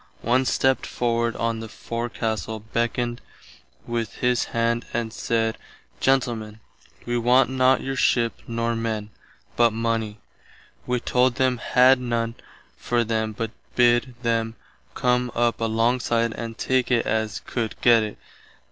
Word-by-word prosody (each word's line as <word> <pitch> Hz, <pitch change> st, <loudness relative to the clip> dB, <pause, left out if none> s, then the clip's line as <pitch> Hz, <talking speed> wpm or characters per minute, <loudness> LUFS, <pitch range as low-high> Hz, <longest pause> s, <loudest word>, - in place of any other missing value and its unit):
One 125 Hz, +3 st, +2 dB
stept 130 Hz, +1 st, +1 dB
forward 115 Hz, -1 st, 0 dB
on 115 Hz, -1 st, -1 dB
the 110 Hz, 0 st, -7 dB
forecastle, 110 Hz, -1 st, -4 dB
beckoned 120 Hz, +2 st, -2 dB, 0.6 s
with 115 Hz, -3 st, -3 dB
his 125 Hz, -1 st, +1 dB
hand 115 Hz, 0 st, 0 dB
and 115 Hz, -2 st, -2 dB
said, 115 Hz, -1 st, -1 dB, 0.4 s
Gentlemen, 115 Hz, -5 st, 0 dB, 0.5 s
wee 120 Hz, 0 st, -1 dB
want 125 Hz, +3 st, +4 dB
not 130 Hz, 0 st, +3 dB
your 135 Hz, 0 st, -3 dB
ship 120 Hz, -2 st, +2 dB
nor 115 Hz, 0 st, -1 dB
men, 110 Hz, -2 st, -3 dB, 0.4 s
but 120 Hz, -2 st, +4 dB
money. 115 Hz, -2 st, -1 dB, 0.7 s
Wee 125 Hz, 0 st, +1 dB
told 125 Hz, 0 st, +2 dB
them 130 Hz, -3 st, +1 dB
had 130 Hz, +2 st, +5 dB
none 115 Hz, -2 st, -1 dB, 0.5 s
for 120 Hz, -1 st, +1 dB
them 110 Hz, -1 st, -1 dB
but 115 Hz, +1 st, -4 dB, 0.2 s
bid 120 Hz, +1 st, +3 dB
them 115 Hz, -1 st, 0 dB, 0.4 s
come 125 Hz, 0 st, +1 dB
up 120 Hz, -1 st, +1 dB
alongside 115 Hz, 0 st, +1 dB
and 115 Hz, 0 st, -6 dB
take 130 Hz, -1 st, +1 dB
it 120 Hz, -2 st, +2 dB
as 110 Hz, -1 st, -1 dB
could 115 Hz, -3 st, -3 dB
gett 120 Hz, -2 st, +6 dB
it. 105 Hz, -1 st, -4 dB
115 Hz, 135 wpm, -24 LUFS, 115-125 Hz, 0.7 s, gett